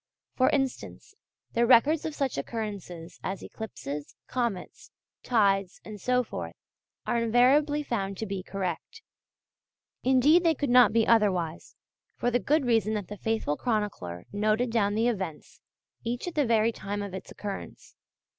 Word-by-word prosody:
For 255 - +3
instance, 270 -3 -2 0.4
their 235 0 +2
records 285 +6 +5
of 310 - -6
such 275 -2 -1
occurrences 200 -7 -6
as 190 0 -4
eclipses, 150 -10 -7
comets, 235 -8 -3 0.3
tides, 200 -5 +1
and 210 -2 -9
so 250 +3 +2
forth, - - -6 0.5
are 235 - +1
invariably 270 +6 +3
found 195 -7 -3
to 220 - -3
be 195 -2 -4
correct. 190 - -5 1.0
Indeed 265 +7 +5
they 330 -2 +3
could 280 -2 -1
not 250 0 +7
be 225 -1 +3
otherwise, 185 -8 +1 0.4
for 245 - 0
the 245 - +2
good 300 +2 +1
reason 220 -3 +2
that 205 -4 -4
the 210 - -7
faithful 220 -9 -1
chronicler 205 - -2
noted 215 +4 +1
down 205 -3 +1
the 225 +2 +2
events, 190 -9 -4 0.4
each 240 +7 -3
at 350 - -4
the 295 -4 +1
very 225 0 +3
time 205 -2 -4
of 200 -2 -7
its 190 - -7
occurrence. 200 -2 -8
225 Hz, 150 wpm, -28 LUFS, 195-250 Hz, 1.0 s, not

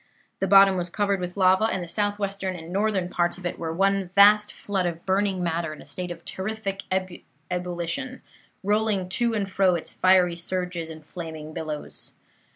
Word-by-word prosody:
The 195 - 0
bottom 195 0 +7
was 175 0 -2
covered 200 +1 0
with 180 +1 -5
lava, 190 +2 +4
and 190 -5 -1
the - - -7
southwestern 200 -1 -1
and 165 0 -8
northern 200 -2 +1
parts 175 -1 0
of 185 - -11
it 175 - -3
were 165 -1 -3
one 195 +2 +1
vast 210 +1 +7
flood 190 -3 -2
of 170 -1 -5
burning 190 -1 +1
matter 165 -2 -1
in 155 - -12
a - - -12
state 180 +5 -6
of 170 -1 -8
terrific 195 0 -4 0.7
ebullition, 180 +8 -3 0.4
rolling 205 -2 +1
to 235 +4 +1
and 200 -2 -1
fro 190 -2 +3
its 170 - -5
'fiery 185 -2 +4
surges' 180 -1 -3
and 155 -1 -10
flaming 160 -2 -7
billows. 155 -2 -6
185 Hz, 175 wpm, -25 LUFS, 175-200 Hz, 0.7 s, bottom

